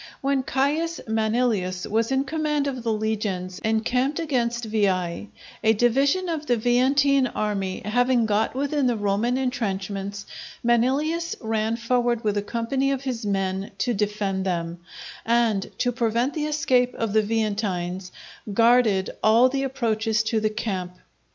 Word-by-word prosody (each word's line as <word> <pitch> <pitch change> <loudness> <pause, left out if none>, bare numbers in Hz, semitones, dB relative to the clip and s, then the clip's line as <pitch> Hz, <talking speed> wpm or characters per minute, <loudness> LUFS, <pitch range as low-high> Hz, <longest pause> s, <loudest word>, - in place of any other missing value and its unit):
When 275 0 +1
Caius 295 +6 0
Manilius 220 -4 0
was 225 +3 0
in 265 0 +2
command 300 0 -1
of 265 -3 -3
the 230 -1 -1
legions 210 -4 -2
encamped 250 +7 0
against 240 -7 -1
Veii, 195 -4 0 0.3
a 220 0 +5
division 275 - +2
of 315 -3 -3
the 245 - +2
Veientine 260 +3 +3
army 195 -3 -2
having 245 +2 +2
got 215 +2 0
within 280 0 0
the 240 - +1
Roman 210 +5 0
intrenchments, 200 -5 -3 0.4
Manilius 275 +8 +1
ran 220 -1 -1
forward 240 0 0
with 210 -1 0
a 205 - +1
company 240 +6 -1
of 270 -1 -2
his 240 -5 -3
men 195 0 -1
to 245 +5 0
defend 205 -2 -1
them, 170 -2 -2 0.4
and, 230 -4 +1
to 245 - +1
prevent 235 +2 0
the 305 -2 -2
escape 260 -5 +1
of 225 -3 -2
the 220 - +5
Veientines, 200 -4 -2 0.4
guarded 230 -3 +3
all 230 +4 +5
the 270 +1 -1
approaches 225 -5 0
to 225 0 0
the 215 0 +1
camp. 195 -5 -3
230 Hz, 145 wpm, -24 LUFS, 205-260 Hz, 0.4 s, a